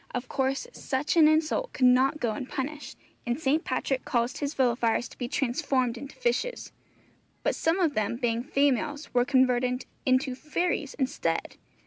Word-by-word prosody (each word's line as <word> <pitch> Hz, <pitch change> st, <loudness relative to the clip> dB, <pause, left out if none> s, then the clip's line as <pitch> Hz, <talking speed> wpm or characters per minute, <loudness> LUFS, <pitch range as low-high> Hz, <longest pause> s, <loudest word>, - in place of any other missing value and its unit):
Of 250 Hz, 0 st, -3 dB
course 270 Hz, -, -1 dB
such 275 Hz, +4 st, -2 dB
an 320 Hz, -2 st, +7 dB
insult 315 Hz, +11 st, +1 dB
could 255 Hz, -, +2 dB
not 260 Hz, +4 st, +4 dB
go 235 Hz, -5 st, 0 dB
unpunished, 270 Hz, +5 st, -5 dB, 0.3 s
and 240 Hz, +3 st, -1 dB
St. 310 Hz, +1 st, +1 dB
Patrick 260 Hz, 0 st, -1 dB
caused 240 Hz, 0 st, -1 dB
his 290 Hz, +1 st, -3 dB
villifiers 240 Hz, -2 st, +1 dB
to -, -, -15 dB
be 245 Hz, -, -2 dB
transformed 260 Hz, -2 st, 0 dB
into 275 Hz, +4 st, -9 dB
fishes; -, -, -2 dB, 0.7 s
but -, -, +1 dB
some 325 Hz, +4 st, +1 dB
of 330 Hz, -5 st, +2 dB
them 215 Hz, -1 st, 0 dB
being 235 Hz, -1 st, 0 dB
females, 285 Hz, +2 st, 0 dB
were 245 Hz, 0 st, +3 dB
converted 250 Hz, -2 st, +2 dB, 0.2 s
into 260 Hz, +1 st, +2 dB
fairies 300 Hz, +1 st, -2 dB
instead. 265 Hz, -2 st, -2 dB
265 Hz, 155 wpm, -27 LUFS, 250-300 Hz, 0.7 s, an